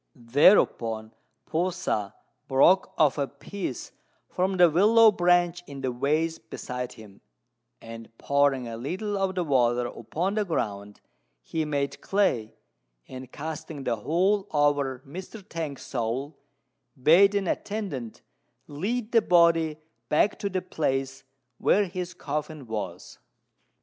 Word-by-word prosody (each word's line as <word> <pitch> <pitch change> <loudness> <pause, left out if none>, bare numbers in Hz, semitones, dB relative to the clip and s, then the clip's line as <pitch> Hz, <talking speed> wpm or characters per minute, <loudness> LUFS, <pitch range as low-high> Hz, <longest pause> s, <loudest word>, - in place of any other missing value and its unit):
Thereupon 115 - +3 0.3
P'u 175 +4 0
sa 105 - -2 0.3
broke 170 +8 +4
off 150 -2 +3
a 140 - 0
piece 140 - -6 0.4
from 185 +1 -1
the 175 -1 +7
willow 215 +7 +6
branch 175 -2 +2
in 140 -1 -8
the 130 -1 -1
vase 155 +6 0
beside 125 0 -6
him; 105 -3 -15 0.6
and, 115 0 -10
pouring 140 -3 +1
a 115 -1 -6
little 185 - -3
of 195 -1 -1
the 180 - 0
water 125 -5 +2
upon 160 - -3
the 215 0 +1
ground, 105 - -4 0.4
he 160 - -2
made 140 -2 -2
clay, 155 - 0 0.5
and, 130 -1 -9
casting 155 -1 -6
the 120 -3 -1
whole 190 - +1
over 145 -3 +1
Mr. 185 +7 -9
T'ang's 155 -7 -5
soul, 130 +4 -3 0.6
bade 190 +9 +6
an 200 -2 0
attendant 175 - -4 0.4
lead 215 +10 -3
the 230 - +5
body 165 -4 +3 0.3
back 180 +7 +2
to 200 - -2
the 185 -1 -2
place 135 -6 -2 0.4
where 205 +1 +3
his 180 0 -6
coffin 150 -2 -5
was. 105 -6 -6
150 Hz, 130 wpm, -26 LUFS, 130-185 Hz, 0.6 s, the